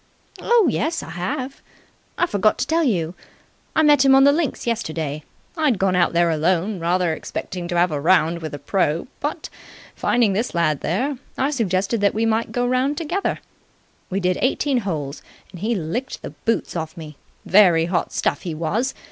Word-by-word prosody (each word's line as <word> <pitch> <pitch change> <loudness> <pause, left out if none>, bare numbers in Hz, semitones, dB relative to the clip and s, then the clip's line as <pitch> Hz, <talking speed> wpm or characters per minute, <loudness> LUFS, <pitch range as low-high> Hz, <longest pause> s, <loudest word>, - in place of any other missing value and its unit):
"Oh 470 -6 +4
yes, 320 +5 -1
I 160 - -9
have. 195 +10 -4 0.6
I - - +3
forgot 215 - +1
to - - -1
tell 330 +1 +1
you. 175 - 0 0.6
I 315 - +4
met 295 -3 +5
him 270 -1 +6
on 270 - +6
the 280 - +7
links 305 -1 -1
yesterday. 160 -10 -2 0.3
I'd 300 - +2
gone 190 -1 +1
out 175 -1 +3
there 170 0 +3
alone, 175 +5 0
rather 175 0 +1
expecting 175 +2 -5
to 175 -1 -2
have 175 0 +3
a 145 -2 -2
round 170 0 +3
with 155 -2 -6
the - - -4
pro., 165 -1 0
but, 305 +2 -3 0.5
finding 230 -5 +2
this 220 +2 -2
lad 155 -4 +1
there, 250 - -1 0.2
I 270 +3 +1
suggested 205 -3 0
that 200 0 +2
we 225 +1 +1
might 225 +1 0
go 245 0 0
round 255 +4 +1
together. 345 +5 -2 0.7
We 190 - -1
did 180 -1 0
eighteen 265 0 +1
holes, 155 -9 -4 0.3
and 180 - -10
he 225 +5 0
licked 205 +9 -4
the - - -6
boots 230 - -2
off 160 0 -4
me. 155 -2 -9 0.3
Very 175 -5 +5
hot 175 0 -1
stuff - - -1
he 170 -4 -5
was. 210 +12 -1
195 Hz, 185 wpm, -22 LUFS, 170-260 Hz, 0.7 s, the